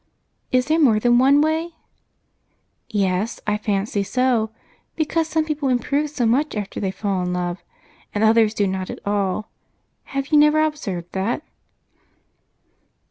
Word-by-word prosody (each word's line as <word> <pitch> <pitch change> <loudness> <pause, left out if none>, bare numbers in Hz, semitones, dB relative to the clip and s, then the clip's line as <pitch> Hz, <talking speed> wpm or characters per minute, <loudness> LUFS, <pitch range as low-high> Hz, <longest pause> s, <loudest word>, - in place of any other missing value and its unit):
"Is 255 0 +3
there 315 +3 +2
more 235 -9 +4
than 240 +2 +4
one 275 +3 +5
way?" 320 +2 -1 1.1
"Yes, 200 0 -1
I 210 0 0
fancy 205 0 -1
so, 240 +1 +1 0.5
because 320 +1 0
some 320 -1 0
people 300 -3 -1
improve 280 +4 0
so 270 -5 -1
much 265 +6 +1
after 205 -2 -4
they 195 - -1
fall 195 -1 -2
in 180 0 -2
love, 175 -1 -3 0.5
and 210 - -1
others 220 0 +4
do 205 - +1
not 190 -1 -3
at - - -5
all. 200 0 -1 0.5
Have 275 0 -4
you 300 - +5
never 300 +1 +5
observed 195 - -3
that?" 200 +10 -2
230 Hz, 145 wpm, -22 LUFS, 200-295 Hz, 1.1 s, one